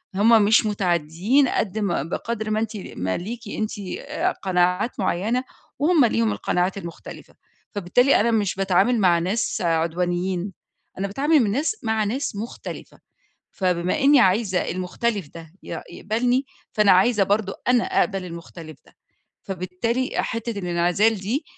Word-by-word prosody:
هُم 220 Hz, +3 st, +5 dB
مش 220 Hz, +2 st, +4 dB
متعديين 190 Hz, -, +1 dB
قد 215 Hz, 0 st, -1 dB
ما 195 Hz, -9 st, 0 dB
بقدَر 220 Hz, +7 st, -4 dB
ما 215 Hz, -, +1 dB
أنتِ 220 Hz, -1 st, -3 dB
ما 95 Hz, -, -4 dB
ليكِ 225 Hz, +6 st, -6 dB
أنتِ 215 Hz, +1 st, -3 dB, 0.3 s
آآ 315 Hz, +6 st, -1 dB
قَنَاعات 180 Hz, -, 0 dB
معينة، 215 Hz, +7 st, 0 dB, 0.4 s
وهُم 305 Hz, -2 st, +4 dB
ليهم 115 Hz, -, +1 dB
القَنَاعات 180 Hz, -, -1 dB
المختلفة؛ 170 Hz, -3 st, -10 dB, 0.4 s
فبالتالي 210 Hz, +8 st, +3 dB
أنا 235 Hz, +2 st, +2 dB
مش 210 Hz, -4 st, +1 dB
باتعامل 195 Hz, +5 st, +2 dB
مع 175 Hz, -4 st, +4 dB
ناس 190 Hz, +7 st, -1 dB
عدوانيين، 175 Hz, +3 st, -1 dB, 0.5 s
أنا 200 Hz, -, -1 dB
باتعامل 290 Hz, +10 st, +2 dB
من 220 Hz, -6 st, +2 dB
ناس 295 Hz, -, 0 dB
مع 220 Hz, -1 st, +1 dB
ناس 230 Hz, +3 st, -2 dB
مختلفة، 220 Hz, +4 st, -8 dB, 0.5 s
فبما 180 Hz, -, 0 dB
إني 280 Hz, 0 st, +6 dB
عايزة 190 Hz, -2 st, +2 dB
المختلف 185 Hz, 0 st, -2 dB
ده 165 Hz, -1 st, -11 dB
ي -, -, -6 dB
يقبَلني، 245 Hz, +5 st, 0 dB, 0.3 s
فأنا 210 Hz, -2 st, +5 dB
عايزة 195 Hz, +3 st, +4 dB
برضه 200 Hz, 0 st, 0 dB
أنا 250 Hz, -1 st, +4 dB
أقبَل 195 Hz, -3 st, 0 dB
المختلف 170 Hz, -3 st, -10 dB
ده. -, -, -23 dB, 0.5 s
فبالتالي 195 Hz, +7 st, -2 dB
حتّة 230 Hz, -2 st, -2 dB
الانعزال 180 Hz, +4 st, +2 dB
دي 215 Hz, -, -2 dB
200 Hz, 140 wpm, -23 LUFS, 180-230 Hz, 0.5 s, إني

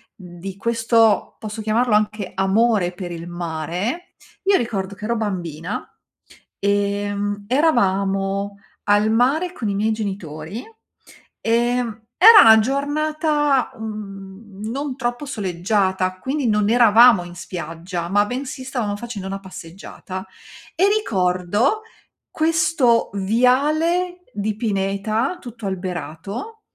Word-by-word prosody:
di 185 Hz, 0 st, -9 dB
questo, 225 Hz, -1 st, +2 dB
posso 215 Hz, 0 st, -6 dB
chiamarlo 220 Hz, +1 st, +2 dB
anche 210 Hz, -2 st, -1 dB
amore 195 Hz, -1 st, +2 dB
per 180 Hz, -1 st, -7 dB
il 170 Hz, 0 st, -7 dB
mare, 175 Hz, -, -4 dB, 0.3 s
io 390 Hz, 0 st, +4 dB
ricordo 200 Hz, -5 st, -3 dB
che 210 Hz, +2 st, -8 dB
ero 235 Hz, +1 st, 0 dB
bambina, 180 Hz, -4 st, -4 dB, 0.8 s
ehm, 205 Hz, 0 st, -1 dB
eravamo 200 Hz, -7 st, +1 dB, 0.3 s
al 205 Hz, +1 st, +3 dB
mare 280 Hz, +11 st, +2 dB
con 220 Hz, -9 st, -3 dB
i -, -, -1 dB
miei 215 Hz, +2 st, +1 dB
genitori, 195 Hz, -, -5 dB, 0.8 s
ehm, 235 Hz, -1 st, 0 dB
era 440 Hz, +5 st, +10 dB
una 220 Hz, -1 st, +8 dB
giornata, 295 Hz, +2 st, 0 dB
uhm, 200 Hz, -2 st, -9 dB
non 275 Hz, +2 st, -3 dB
troppo 245 Hz, +2 st, -3 dB
soleggiata, 190 Hz, -4 st, -1 dB
quindi 265 Hz, +5 st, -2 dB
non 210 Hz, -1 st, +2 dB
eravamo 230 Hz, -3 st, +6 dB
in 175 Hz, 0 st, -10 dB
spiaggia, 170 Hz, 0 st, -6 dB
ma 205 Hz, +1 st, +3 dB
bensì 260 Hz, +1 st, -5 dB
stavamo 240 Hz, -6 st, -2 dB
facendo 205 Hz, -3 st, -6 dB
una 195 Hz, 0 st, -4 dB
passeggiata, 190 Hz, +1 st, -9 dB, 0.5 s
e 385 Hz, +4 st, +4 dB
ricordo 205 Hz, -, +1 dB, 0.5 s
questo 315 Hz, -7 st, +2 dB
viale 300 Hz, -, +1 dB
di 210 Hz, 0 st, -2 dB
pineta 215 Hz, -, -1 dB
tutto 235 Hz, -, -10 dB
alberato 190 Hz, -, -5 dB
210 Hz, 110 wpm, -21 LUFS, 190-245 Hz, 0.8 s, era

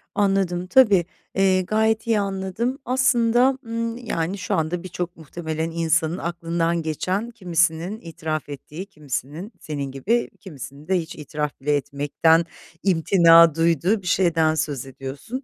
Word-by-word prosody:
anladım, 190 Hz, -3 st, +1 dB
tabii, 205 Hz, -8 st, +5 dB, 0.3 s
eee, 190 Hz, -1 st, +3 dB
gayet 220 Hz, +3 st, +1 dB
iyi 225 Hz, -2 st, +3 dB
anladım. 200 Hz, +6 st, -2 dB
Aslında, 250 Hz, 0 st, +3 dB
ımm, 230 Hz, 0 st, -3 dB
yani, 195 Hz, -6 st, -3 dB
şu 185 Hz, -, -3 dB
anda 165 Hz, +3 st, -1 dB
birçok 180 Hz, -1 st, -5 dB
muhtemelen 160 Hz, +1 st, -4 dB
insanın 165 Hz, +1 st, +1 dB
aklından 170 Hz, -1 st, -1 dB
geçen, 185 Hz, +8 st, -2 dB
kimisinin 175 Hz, -1 st, 0 dB
itiraf 160 Hz, -3 st, -5 dB
ettiği, 150 Hz, +5 st, -8 dB
kimisinin 150 Hz, -, -6 dB
senin 145 Hz, -3 st, -5 dB
gibi, 215 Hz, -, 0 dB
kimisinin 145 Hz, -, -10 dB
de 190 Hz, -, +2 dB
hiç 165 Hz, 0 st, -7 dB
itiraf 150 Hz, -1 st, -4 dB
bile 145 Hz, +1 st, +1 dB
etmekten 145 Hz, +4 st, +2 dB, 0.4 s
imtina 170 Hz, -3 st, +6 dB
duyduğu 170 Hz, +5 st, +2 dB
bir 180 Hz, -, -9 dB
şeyden 165 Hz, -3 st, +2 dB
söz 145 Hz, -4 st, -2 dB
ediyorsun. 135 Hz, -, -7 dB
170 Hz, 130 wpm, -23 LUFS, 155-195 Hz, 0.4 s, imtina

